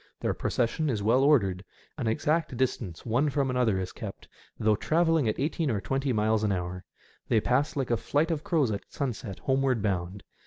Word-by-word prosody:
Their -, -, 0 dB
procession 135 Hz, +6 st, 0 dB
is 110 Hz, -5 st, -1 dB
well 120 Hz, +5 st, +4 dB
ordered. 100 Hz, -11 st, +3 dB, 0.3 s
An 130 Hz, -7 st, -3 dB
exact 150 Hz, +4 st, 0 dB
distance 100 Hz, -9 st, -2 dB
one 125 Hz, +6 st, +2 dB
from 135 Hz, -1 st, 0 dB
another 125 Hz, -6 st, +2 dB
is 95 Hz, 0 st, -4 dB
kept, 110 Hz, -5 st, -8 dB, 0.3 s
though 110 Hz, -1 st, +3 dB
travelling 165 Hz, 0 st, +2 dB
at 110 Hz, -, -2 dB
eighteen 155 Hz, +2 st, 0 dB
or 110 Hz, -5 st, 0 dB
twenty 135 Hz, +5 st, -1 dB
miles 110 Hz, -1 st, +1 dB
an 105 Hz, -, +2 dB
hour. 90 Hz, 0 st, -3 dB, 0.5 s
They 115 Hz, -, +4 dB
pass 130 Hz, +8 st, +1 dB
like 135 Hz, -4 st, -1 dB
a 120 Hz, -, +3 dB
flight 150 Hz, +8 st, 0 dB
of 155 Hz, -2 st, -2 dB
crows 150 Hz, -9 st, +1 dB
at 100 Hz, -, -2 dB
sunset 120 Hz, -7 st, -4 dB
homeward 130 Hz, -4 st, +1 dB
bound. 95 Hz, -1 st, -2 dB
120 Hz, 190 wpm, -28 LUFS, 105-140 Hz, 0.5 s, well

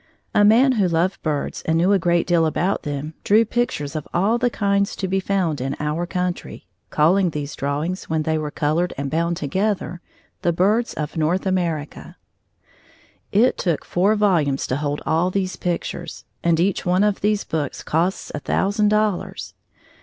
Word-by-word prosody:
A 205 Hz, -, +4 dB
man 235 Hz, +6 st, +6 dB
who 210 Hz, -7 st, +2 dB
loved 175 Hz, +3 st, 0 dB
birds 150 Hz, -3 st, -2 dB
and 160 Hz, 0 st, 0 dB
knew 180 Hz, +4 st, +3 dB
a 195 Hz, -, +3 dB
great 175 Hz, -1 st, +2 dB
deal 170 Hz, -2 st, +3 dB
about 180 Hz, +5 st, 0 dB
them 145 Hz, +2 st, -4 dB
drew 220 Hz, +3 st, +4 dB
pictures 210 Hz, -11 st, -2 dB
of 155 Hz, -, -4 dB
all 205 Hz, +7 st, +2 dB
the 245 Hz, 0 st, +2 dB
kinds 200 Hz, -3 st, 0 dB
to 190 Hz, -, -3 dB
be 190 Hz, +1 st, 0 dB
found 185 Hz, -7 st, -1 dB
in 135 Hz, +2 st, -2 dB
our 155 Hz, +3 st, -2 dB
country, 180 Hz, -, -4 dB, 0.2 s
calling 175 Hz, +5 st, +3 dB
these 150 Hz, -2 st, -5 dB
drawings, 150 Hz, +7 st, -2 dB
when 160 Hz, -1 st, -1 dB
they 160 Hz, +1 st, 0 dB
were 150 Hz, -1 st, -3 dB
colored 155 Hz, +4 st, -1 dB
and 140 Hz, 0 st, -3 dB
bound 170 Hz, +1 st, 0 dB
together 185 Hz, +3 st, -2 dB, 0.4 s
The 170 Hz, -, +1 dB
Birds 210 Hz, +7 st, +1 dB
of 150 Hz, +1 st, -4 dB
North 165 Hz, +5 st, +1 dB
America. 170 Hz, -6 st, -2 dB, 1.2 s
It 230 Hz, +6 st, +3 dB
took 170 Hz, -5 st, -1 dB
four 195 Hz, +5 st, +2 dB
volumes 170 Hz, -10 st, +2 dB
to 130 Hz, -, -1 dB
hold 145 Hz, 0 st, -3 dB
all 165 Hz, +3 st, +2 dB
these 185 Hz, 0 st, -2 dB
pictures, 175 Hz, -1 st, -4 dB, 0.2 s
and 170 Hz, -1 st, +2 dB
each 185 Hz, +2 st, +1 dB
one 180 Hz, +2 st, +2 dB
of 210 Hz, -1 st, +1 dB
these 210 Hz, 0 st, +1 dB
books 150 Hz, -4 st, -3 dB
costs 170 Hz, +5 st, -1 dB
a 150 Hz, -, -3 dB
thousand 205 Hz, +7 st, +1 dB
dollars. 210 Hz, -3 st, -1 dB
175 Hz, 175 wpm, -22 LUFS, 155-200 Hz, 1.2 s, man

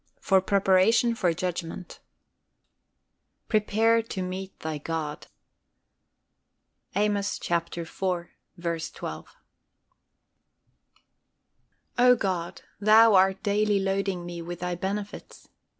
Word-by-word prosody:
FOR 190 Hz, -1 st, +3 dB
PREPARATION 200 Hz, +5 st, +3 dB
FOR 185 Hz, -6 st, +1 dB
JUDGMENT. 175 Hz, 0 st, -5 dB, 1.5 s
"Prepare 220 Hz, +1 st, +2 dB
to 195 Hz, -4 st, -5 dB
meet 190 Hz, +1 st, -6 dB
thy 155 Hz, -1 st, -4 dB
God." 155 Hz, -1 st, -4 dB, 1.7 s
Amos 205 Hz, 0 st, 0 dB
iv. 170 Hz, 0 st, -2 dB
12. 170 Hz, -2 st, -5 dB, 2.6 s
O 250 Hz, 0 st, +7 dB
God, 185 Hz, -6 st, -3 dB, 0.2 s
Thou 215 Hz, +2 st, +6 dB
art 190 Hz, 0 st, +4 dB
daily 205 Hz, 0 st, +2 dB
loading 195 Hz, -2 st, -1 dB
me 175 Hz, -1 st, -6 dB
with 175 Hz, +1 st, -7 dB
Thy 180 Hz, 0 st, -2 dB
benefits. 200 Hz, +3 st, -6 dB
190 Hz, 85 wpm, -26 LUFS, 175-205 Hz, 2.6 s, O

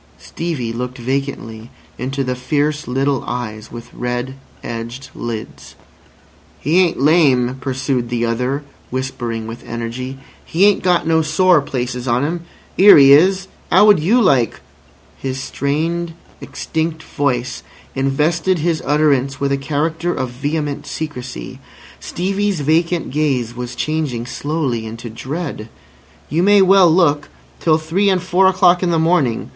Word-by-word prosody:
Stevie 145 Hz, -9 st, -4 dB
looked 125 Hz, +2 st, -5 dB
vacantly 120 Hz, -3 st, -4 dB, 0.3 s
into 135 Hz, +2 st, -2 dB
the 130 Hz, -1 st, -1 dB
fierce 145 Hz, +4 st, -1 dB
little 135 Hz, +1 st, 0 dB
eyes 110 Hz, -3 st, -5 dB
with 115 Hz, 0 st, -10 dB
red 125 Hz, +1 st, -3 dB, 0.3 s
edged 120 Hz, +3 st, -6 dB
lids. 115 Hz, -2 st, -7 dB, 0.8 s
"He 160 Hz, +6 st, +2 dB
ain't 180 Hz, -2 st, +2 dB
lame," 135 Hz, -4 st, +3 dB
pursued 130 Hz, -2 st, -2 dB
the 120 Hz, -1 st, 0 dB
other, 125 Hz, +5 st, -1 dB, 0.3 s
whispering 120 Hz, -3 st, -4 dB
with 115 Hz, +2 st, -8 dB
energy. 120 Hz, +3 st, -5 dB, 0.3 s
"He 180 Hz, +5 st, +2 dB
ain't 205 Hz, -1 st, +4 dB
got 180 Hz, -2 st, +2 dB
no 160 Hz, 0 st, +3 dB
sore 180 Hz, +1 st, +3 dB
places 125 Hz, -2 st, -4 dB
on 120 Hz, +3 st, +1 dB
'im. 170 Hz, +3 st, -2 dB, 0.4 s
'Ere 200 Hz, -1 st, +9 dB
he 140 Hz, -1 st, +8 dB
is. 190 Hz, +5 st, +4 dB, 0.2 s
'Ow 190 Hz, +4 st, +6 dB
would 210 Hz, -4 st, +6 dB
you 200 Hz, +11 st, +3 dB
like—" 130 Hz, -, +2 dB, 0.6 s
His 130 Hz, -1 st, -4 dB
strained, 160 Hz, +6 st, -2 dB, 0.3 s
extinct 160 Hz, 0 st, -3 dB
voice 125 Hz, -4 st, -2 dB, 0.3 s
invested 155 Hz, +7 st, +1 dB
his 165 Hz, 0 st, 0 dB
utterance 140 Hz, -2 st, +1 dB
with 140 Hz, 0 st, 0 dB
a -, -, +3 dB, 0.2 s
character 160 Hz, +4 st, 0 dB
of 130 Hz, -2 st, -3 dB
vehement 145 Hz, +3 st, -3 dB
secrecy. 125 Hz, -, -6 dB, 0.4 s
Stevie's 195 Hz, -1 st, -2 dB
vacant 165 Hz, +3 st, +1 dB
gaze 130 Hz, -5 st, 0 dB
was 125 Hz, 0 st, -6 dB
changing 150 Hz, -7 st, -2 dB
slowly 135 Hz, -2 st, -2 dB
into 115 Hz, +1 st, -8 dB
dread. 135 Hz, -2 st, -5 dB, 0.6 s
"You 160 Hz, +3 st, 0 dB
may 200 Hz, +1 st, +5 dB
well 190 Hz, -2 st, +6 dB
look! 155 Hz, -3 st, +2 dB, 0.3 s
Till 155 Hz, -2 st, +3 dB
three 165 Hz, +6 st, 0 dB
and 190 Hz, -1 st, +2 dB
four 185 Hz, +1 st, +3 dB
o'clock 180 Hz, -1 st, +4 dB
in 180 Hz, -, +1 dB
the 170 Hz, -, +2 dB
morning. 160 Hz, -8 st, +1 dB
140 Hz, 140 wpm, -18 LUFS, 125-165 Hz, 0.8 s, Ere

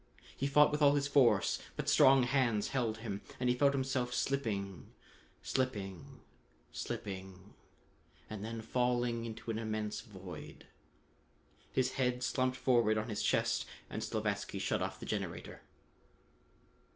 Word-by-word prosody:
He 140 Hz, -, -1 dB
fought 150 Hz, +1 st, +6 dB
with 150 Hz, +1 st, -1 dB
all 145 Hz, 0 st, +6 dB
his 140 Hz, -1 st, +1 dB
force, 140 Hz, -4 st, +4 dB, 0.2 s
but -, -, -4 dB
strong 135 Hz, -1 st, +6 dB
hands 120 Hz, -4 st, +1 dB
held 120 Hz, -5 st, 0 dB
him, 100 Hz, -2 st, -3 dB, 0.2 s
and 125 Hz, 0 st, +1 dB
he 125 Hz, -, +3 dB
felt 140 Hz, +2 st, +4 dB
himself 130 Hz, -2 st, -1 dB
slipping 100 Hz, -9 st, -2 dB, 0.5 s
slipping 100 Hz, -9 st, -3 dB, 0.5 s
slipping 95 Hz, 0 st, -6 dB, 0.7 s
and 105 Hz, -1 st, -6 dB
then 115 Hz, 0 st, -5 dB
falling 120 Hz, 0 st, 0 dB
into 115 Hz, 0 st, -5 dB
an 110 Hz, -, -2 dB
immense 110 Hz, -1 st, -3 dB
void. 95 Hz, -7 st, -10 dB, 1.1 s
His 130 Hz, -1 st, +1 dB
head 125 Hz, 0 st, +1 dB
slumped 130 Hz, +1 st, 0 dB
forward 120 Hz, -5 st, +3 dB
on 110 Hz, +2 st, -2 dB
his 105 Hz, -, -2 dB
chest -, -, +1 dB, 0.2 s
and -, -, -3 dB
Slavatsky -, -, -2 dB
shut -, -, 0 dB
off -, -, -3 dB
the -, -, -7 dB
generator. -, -, -4 dB
120 Hz, 135 wpm, -34 LUFS, 105-130 Hz, 1.1 s, fought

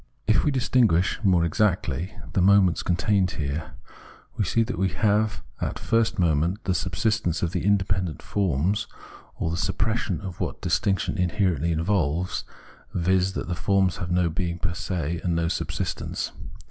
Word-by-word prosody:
If 110 Hz, -, +3 dB
we -, -, +2 dB
distinguish 120 Hz, -, +2 dB
more 90 Hz, -4 st, +4 dB
exactly 90 Hz, -1 st, 0 dB, 0.2 s
the 95 Hz, -, +2 dB
moments 95 Hz, -2 st, +5 dB
con 90 Hz, -, +1 dB
tained 95 Hz, +2 st, +2 dB
here, 80 Hz, +2 st, -3 dB, 0.6 s
we -, -, 0 dB
see 115 Hz, +5 st, +2 dB
that 120 Hz, +3 st, -4 dB
we 95 Hz, 0 st, +2 dB
have 105 Hz, +2 st, +1 dB, 0.2 s
as -, -, -1 dB
first 115 Hz, -1 st, +1 dB
moment 85 Hz, +3 st, +1 dB
the 95 Hz, -, 0 dB
subsistence 90 Hz, -1 st, 0 dB
of 85 Hz, -, 0 dB
the -, -, -2 dB
independent 95 Hz, -4 st, 0 dB
forms, 100 Hz, +3 st, 0 dB, 0.5 s
or 80 Hz, -, -2 dB
the 85 Hz, -, -2 dB
suppression 110 Hz, 0 st, -1 dB
of 95 Hz, -4 st, -7 dB
what -, -, -3 dB
distinction 95 Hz, +4 st, 0 dB
inherently 90 Hz, -3 st, +1 dB
involves, 85 Hz, 0 st, 0 dB, 0.5 s
viz. 95 Hz, +2 st, +2 dB
that -, -, -4 dB
the 90 Hz, -, -2 dB
forms 95 Hz, +1 st, +1 dB
have 90 Hz, -2 st, -4 dB
no 90 Hz, 0 st, +2 dB
being 85 Hz, +1 st, -2 dB
per 85 Hz, 0 st, -2 dB
se, 85 Hz, -2 st, -3 dB
and 85 Hz, -2 st, 0 dB
no 85 Hz, 0 st, +1 dB
subsistence. -, -, -3 dB
90 Hz, 160 wpm, -25 LUFS, 85-100 Hz, 0.6 s, moments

